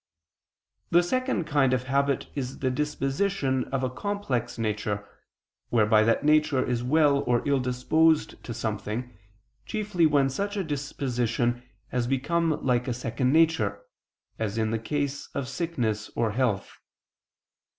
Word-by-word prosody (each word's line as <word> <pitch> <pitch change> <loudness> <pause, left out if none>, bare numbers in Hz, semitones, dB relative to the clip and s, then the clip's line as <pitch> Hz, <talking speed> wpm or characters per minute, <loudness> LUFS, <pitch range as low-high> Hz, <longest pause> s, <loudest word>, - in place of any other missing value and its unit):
The 175 +1 +5
second 255 0 0
kind 145 -4 +2
of 125 0 0
habit 140 +1 +1
is 135 -2 -4
the 130 -1 0
disposition 135 0 0
of 135 -1 -2
a 130 - +1
complex 135 - -2
nature, 105 -2 -2 0.6
whereby 110 -2 +4
that 115 +5 +2
nature 150 -3 +3
is 120 -1 -1
well 145 +1 +4
or 120 +2 +1
ill 140 -1 +3
disposed 150 +6 +2
to - - -6
something, 110 +2 -4 0.5
chiefly 205 -6 +1
when 145 -2 +3
such 200 +7 -3
a 195 - 0
disposition 125 -5 -1 0.3
has 125 -1 -1
become 155 +5 0
like 125 -1 +2
a 125 - -1
second 125 +1 -1
nature, 155 -11 +3 0.6
as 110 -1 -2
in 110 -1 0
the 115 - 0
case 145 +3 -2
of 140 -2 -2
sickness 125 -9 -2
or 115 -2 +1
health. 110 -4 -1
130 Hz, 140 wpm, -27 LUFS, 120-150 Hz, 0.6 s, The